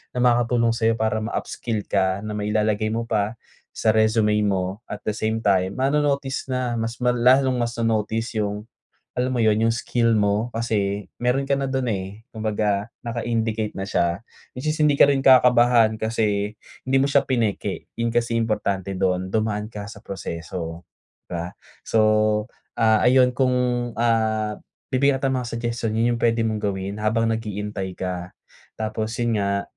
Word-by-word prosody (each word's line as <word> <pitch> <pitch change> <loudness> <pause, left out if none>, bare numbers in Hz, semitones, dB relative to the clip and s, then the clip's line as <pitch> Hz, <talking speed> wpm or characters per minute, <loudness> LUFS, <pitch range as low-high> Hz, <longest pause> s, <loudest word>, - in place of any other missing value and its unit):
na - - -1
makakatulong 120 -1 +3
sa'yo 115 -1 +2
para 110 0 +1
ma-upskill 110 -1 -3
ka 95 -1 +1
na 110 - -5
mailalagay 105 +1 0
mo 115 +1 -1
pa 105 0 0 0.4
sa 110 - +2
resume 110 -1 +3
mo 95 0 -1
at 105 - -4
the 105 - 0
same 110 +1 -1
time, 95 -2 +2
mano-notice 140 0 0
na 125 -2 -1
mas 115 +1 -2
mala 125 0 +3 0.2
lalong 130 -2 0
mas 120 0 -3
ma-notice 115 0 -1
yung, 105 0 -2 0.5
alam 125 +1 0
mo 125 - -1
yun, 110 -2 +4
yung - - +3
skill 115 0 0
mo 105 +3 +1
kasi 105 -3 -1 0.2
meron 135 +3 +1
ka 140 - +2
na 135 -1 -2
dun 130 -1 -1
eh, 100 +1 -4
kumbaga 105 -1 -1
naka-indicate 115 -2 -1
na 95 0 -4
siya. 85 -1 0 0.3
At - - -9
least 155 +3 -1
hindi 145 -2 +3
ka - - +8
rin 140 -1 +2
kakabahan 120 -4 +5
kasi 105 -2 0 0.3
hindi 130 +1 +2
mo 135 - +3
siya 140 0 +3
pineke, 115 -6 -2
yun 115 0 -1
kasi 115 0 0
importante 100 -4 -1
dun, 95 0 0
dumaan 110 0 -1
ka 105 -1 -7
sa 100 -1 -11
proseso, 85 -2 -6 0.5
'di - - -16
ba? 85 -1 -3 0.4
So, 115 - +2 0.8
ah, 110 -1 +4
ayun 125 0 +5
kung 130 0 +1 0.4
ah, 110 -2 0 0.3
bibigyan 135 0 +2
kita 135 - +2
ng 130 - 0
mga 125 - -5
suggestion, 115 -1 -2
yun 115 +2 +2
yung - - -9
puwede 115 0 +2
mong 110 -1 -1
gawin 100 0 -3
habang 115 +1 +1
nag-iintay 105 -4 -4
ka. 90 -1 -5 0.4
Tapos 110 +1 -3
yun 120 -3 0
nga, 100 0 0
110 Hz, 165 wpm, -23 LUFS, 105-120 Hz, 0.8 s, ka